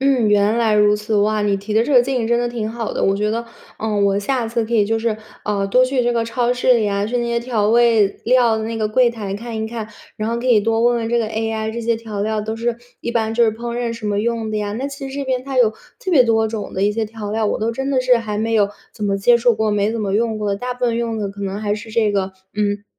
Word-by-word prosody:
嗯， 265 Hz, -5 st, +3 dB
原 205 Hz, +2 st, +3 dB
来 225 Hz, -2 st, +2 dB
如 210 Hz, 0 st, +4 dB
此。 210 Hz, +1 st, -2 dB
哇， 210 Hz, +1 st, +2 dB
你 200 Hz, -1 st, +1 dB
提 205 Hz, +2 st, -5 dB
的 220 Hz, -, +4 dB
这 280 Hz, +5 st, -1 dB
个 250 Hz, -, +8 dB
建 255 Hz, +1 st, -1 dB
议 225 Hz, -, -1 dB
真 235 Hz, -, +3 dB
的 240 Hz, 0 st, 0 dB
挺 225 Hz, -3 st, -3 dB
好 230 Hz, -1 st, -4 dB
的。 -, -, -2 dB
我 195 Hz, 0 st, +2 dB
觉 210 Hz, +1 st, 0 dB
得， 230 Hz, +1 st, -2 dB, 0.4 s
嗯， 210 Hz, -2 st, 0 dB
我 200 Hz, 0 st, +2 dB
下 240 Hz, +3 st, -1 dB
次 230 Hz, 0 st, -1 dB
可 230 Hz, -, -7 dB
以 215 Hz, -3 st, +4 dB
就 225 Hz, -, +1 dB
是， 225 Hz, -1 st, -1 dB, 0.3 s
呃， 200 Hz, -1 st, 0 dB
多 250 Hz, +6 st, +4 dB
去 255 Hz, -1 st, 0 dB
这 240 Hz, -, +2 dB
个 230 Hz, -1 st, 0 dB
超 240 Hz, +1 st, 0 dB
市 250 Hz, 0 st, +3 dB
里 220 Hz, -3 st, +1 dB
啊， 200 Hz, 0 st, 0 dB
去 240 Hz, +3 st, -2 dB
那 240 Hz, -, -1 dB
些 235 Hz, 0 st, 0 dB
调 230 Hz, -4 st, 0 dB
味 230 Hz, -2 st, +5 dB, 0.2 s
料 240 Hz, -2 st, +4 dB
的 220 Hz, -, -3 dB
那 225 Hz, 0 st, -3 dB
个 215 Hz, -, +1 dB
柜 240 Hz, +3 st, +3 dB
台 205 Hz, -4 st, -5 dB
看 230 Hz, +2 st, -6 dB
一 220 Hz, -, -2 dB
看， 220 Hz, -1 st, -6 dB, 0.3 s
然 215 Hz, +1 st, -2 dB
后 235 Hz, -, -1 dB
可 250 Hz, -, -4 dB
以 230 Hz, -4 st, +5 dB
多 225 Hz, +1 st, +1 dB
问 240 Hz, 0 st, +3 dB
问 225 Hz, 0 st, -3 dB
这 235 Hz, -, +1 dB
个 230 Hz, -, 0 dB
AI， 220 Hz, 0 st, -2 dB
这 235 Hz, -, -4 dB
些 230 Hz, 0 st, 0 dB
调 220 Hz, -3 st, -6 dB
料 215 Hz, 0 st, -1 dB
都 220 Hz, +1 st, -4 dB
是 230 Hz, +1 st, -2 dB, 0.2 s
一 235 Hz, -, -3 dB
般 225 Hz, -1 st, 0 dB
就 240 Hz, -, +3 dB
是 220 Hz, -, +3 dB
烹 235 Hz, +2 st, -5 dB
饪 240 Hz, -1 st, -2 dB
什 230 Hz, -2 st, -6 dB
么 205 Hz, 0 st, 0 dB
用 230 Hz, -1 st, -2 dB
的 215 Hz, -, -1 dB
呀。 205 Hz, -1 st, -2 dB
那 265 Hz, +4 st, -3 dB
其 275 Hz, -1 st, -7 dB
实 -, -, -8 dB
这 280 Hz, 0 st, -3 dB
边 255 Hz, -1 st, -1 dB
它 265 Hz, -1 st, -3 dB
有 240 Hz, -, +6 dB, 0.3 s
特 380 Hz, -7 st, -3 dB
别 265 Hz, -6 st, +7 dB
多 225 Hz, -1 st, +2 dB
种 215 Hz, -1 st, -5 dB
的 190 Hz, -, -2 dB
一 210 Hz, -, +2 dB
些 225 Hz, +1 st, -1 dB
调 215 Hz, -1 st, -6 dB
料， 220 Hz, 0 st, 0 dB
我 -, -, -1 dB
都 225 Hz, +2 st, -1 dB
真 270 Hz, +3 st, -3 dB
的 265 Hz, -2 st, +2 dB
是 255 Hz, -1 st, +4 dB
还 210 Hz, -2 st, -4 dB
没 225 Hz, +1 st, 0 dB
有 205 Hz, -2 st, +3 dB, 0.3 s
怎 210 Hz, -, -5 dB
么 200 Hz, -1 st, +1 dB
接 235 Hz, +4 st, +5 dB
触 240 Hz, +1 st, +3 dB
过， 220 Hz, 0 st, 0 dB
没 205 Hz, +1 st, +1 dB
怎 230 Hz, 0 st, -3 dB
么 200 Hz, -2 st, -1 dB
用 220 Hz, 0 st, 0 dB
过 210 Hz, -1 st, -2 dB
的， 200 Hz, -, 0 dB
大 250 Hz, +3 st, -4 dB
部 250 Hz, 0 st, -3 dB
分 230 Hz, -1 st, +1 dB
用 230 Hz, -1 st, -2 dB
的 205 Hz, -2 st, -2 dB
可 200 Hz, +1 st, -10 dB
能 195 Hz, +1 st, -3 dB
还 205 Hz, -1 st, 0 dB
是 220 Hz, +1 st, -8 dB
这 220 Hz, -2 st, +1 dB
个， 190 Hz, -1 st, -1 dB, 0.2 s
嗯， 205 Hz, -1 st, -1 dB
225 Hz, 330 characters per minute, -19 LUFS, 210-235 Hz, 0.4 s, 个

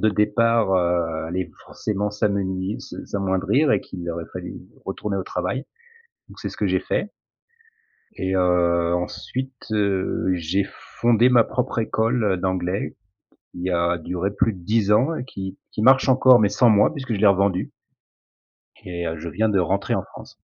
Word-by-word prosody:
de 110 Hz, -, +3 dB
départ, 105 Hz, 0 st, +2 dB
heu, 85 Hz, -3 st, 0 dB
allaient 90 Hz, +2 st, -3 dB
forcément 105 Hz, -1 st, -3 dB
s'amenui 100 Hz, -2 st, -1 dB
s -, -, -10 dB
s'amoindrir 100 Hz, +9 st, +1 dB
et -, -, +2 dB
qu'il 90 Hz, -2 st, -8 dB
aurait 85 Hz, 0 st, -5 dB
fallu -, -, -6 dB, 0.3 s
retourner 100 Hz, -2 st, -3 dB
au 95 Hz, -, -1 dB
travail, 90 Hz, +10 st, -3 dB, 0.6 s
donc -, -, -15 dB
c'est -, -, -3 dB
ce -, -, -10 dB
que -, -, 0 dB
j'ai -, -, +1 dB
fait. -, -, -2 dB, 1.1 s
Et 95 Hz, 0 st, -2 dB
heu, 85 Hz, -1 st, +2 dB
ensuite, 130 Hz, +9 st, -4 dB, 0.2 s
heu, 100 Hz, -4 st, 0 dB
j'ai 90 Hz, +4 st, 0 dB, 0.4 s
fondé 120 Hz, +1 st, +5 dB
ma 120 Hz, -2 st, +6 dB
propre 125 Hz, 0 st, -2 dB
école, 115 Hz, +2 st, 0 dB
heu, 95 Hz, -3 st, +2 dB
d'anglais, 95 Hz, +1 st, -2 dB, 0.6 s
qui 90 Hz, +1 st, -3 dB
a 85 Hz, 0 st, +1 dB
duré 90 Hz, +4 st, -2 dB
plus 110 Hz, +2 st, +1 dB
de 95 Hz, -, -10 dB
10 105 Hz, +1 st, +1 dB
ans 130 Hz, +10 st, +3 dB
et 125 Hz, -, -4 dB
qui 95 Hz, -6 st, -7 dB, 0.2 s
qui 105 Hz, -, -3 dB
marche 130 Hz, +2 st, +5 dB
encore, 130 Hz, -2 st, +6 dB
mais 105 Hz, -, +4 dB
sans 120 Hz, +2 st, +3 dB
moi, 105 Hz, +3 st, +5 dB
puisque 130 Hz, -6 st, -4 dB
je 100 Hz, -, -3 dB
l'ai 105 Hz, -, +5 dB
revendue 100 Hz, -1 st, +2 dB, 1.1 s
et 85 Hz, -1 st, -5 dB
heu, 80 Hz, -, -3 dB
je 85 Hz, -, -6 dB
viens 110 Hz, +6 st, 0 dB
de 100 Hz, -, +2 dB
rentrer 95 Hz, +3 st, 0 dB
en -, -, -1 dB
France. -, -, -13 dB
100 Hz, 175 wpm, -23 LUFS, 90-110 Hz, 1.1 s, ma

